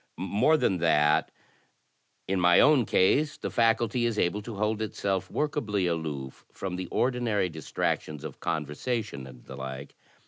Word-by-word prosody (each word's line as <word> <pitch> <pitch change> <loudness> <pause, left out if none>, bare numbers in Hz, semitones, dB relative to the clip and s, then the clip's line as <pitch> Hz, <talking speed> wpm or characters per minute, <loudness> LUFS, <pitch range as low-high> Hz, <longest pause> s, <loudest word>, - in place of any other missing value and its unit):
More 100 - +2
than 95 - +1
that, 75 -2 +3 1.0
ii^;my 90 -1 +4
own 145 -6 +5
case 145 +10 +2
the - - -4
factdty 115 +1 +2
is 115 -2 -2
able 100 +3 +1
to 110 +1 -7
hold 105 +2 -1
itself 95 -3 -2
workably 115 - -1
aloof 75 -6 -4
f - - -22
ro|^' 95 -2 -2
the 90 0 -4
ordinary 120 -6 0
distractions 80 -1 -3
of - - -8
conversation 75 - -3
and 65 -2 -14
the 65 - -9
like. 65 +1 -7
95 Hz, 145 wpm, -28 LUFS, 80-115 Hz, 1.0 s, own